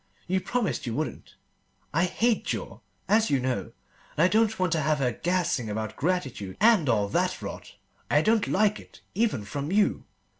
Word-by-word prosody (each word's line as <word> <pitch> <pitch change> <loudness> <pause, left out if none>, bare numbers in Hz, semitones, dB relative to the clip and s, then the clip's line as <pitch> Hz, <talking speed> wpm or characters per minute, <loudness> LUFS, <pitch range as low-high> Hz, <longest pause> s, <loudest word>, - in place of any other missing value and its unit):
You 190 +1 0
promised 210 - -2
you 115 - -2
wouldn't. 155 +3 -5 0.6
I 165 +4 +3
hate 225 +5 +1
jaw, - - -4 0.3
as 220 +1 +3
you 140 - +2
know, 125 -6 -2 0.5
and 155 - +4
I - - +6
don't 220 +1 +2
want 185 -2 0
to 160 - +1
have 155 +1 +1
her 130 -3 +1
gassing 170 -6 -1
about 110 +1 -4
gratitude 135 - -2
and 210 - +5
all 105 -4 +2
that - - 0
rot. - - -8 0.3
I 145 +1 +3
don't 220 -1 +2
like 210 +1 +2
it, - - -16
even 210 - 0
from 140 +8 -4
you. 205 +1 +2
170 Hz, 180 wpm, -27 LUFS, 130-210 Hz, 0.6 s, I